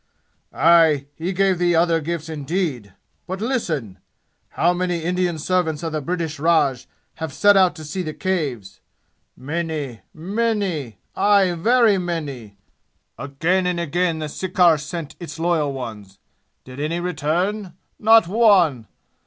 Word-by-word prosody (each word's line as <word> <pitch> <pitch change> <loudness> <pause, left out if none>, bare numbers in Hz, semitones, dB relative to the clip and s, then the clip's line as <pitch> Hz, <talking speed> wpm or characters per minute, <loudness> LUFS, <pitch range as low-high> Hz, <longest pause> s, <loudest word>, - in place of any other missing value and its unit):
"Aye! 160 -4 +4
He 170 +5 -4
gave 190 -1 +1
thee 175 -1 +2
other 165 0 +2
gifts 165 0 -4
indeed! 150 - -3 0.3
But 185 +1 -4
listen! 160 - -3 0.6
How 175 +2 +3
many 175 -2 -2
Indian 180 -1 0
servants 160 -1 -1
of 165 - -3
the 155 -1 -2
British 165 -1 -3
Raj 145 -5 +2 0.3
have 160 -2 -4
set 205 +8 +4
out 185 -2 +4
to 160 - -9
see 155 +5 -4
the 155 -3 -5
Caves? 145 - -3 0.6
Many, 150 -3 -4
many 190 - -2 0.2
aye, 200 -3 +3
very 220 +4 +3
many! 140 - -5 0.6
Again 170 +7 0
and 180 -1 -1
again 170 +1 0
the 155 -1 -4
sirkar 180 0 +2
sent 155 +1 -6
its 170 -1 -8
loyal 165 -3 0
ones. 110 -7 -8 0.5
Did 130 +1 -11
any 155 +4 -2
return? 180 +4 -2 0.3
Not 225 -3 +5
one! 180 - +3
170 Hz, 135 wpm, -21 LUFS, 150-185 Hz, 0.6 s, Not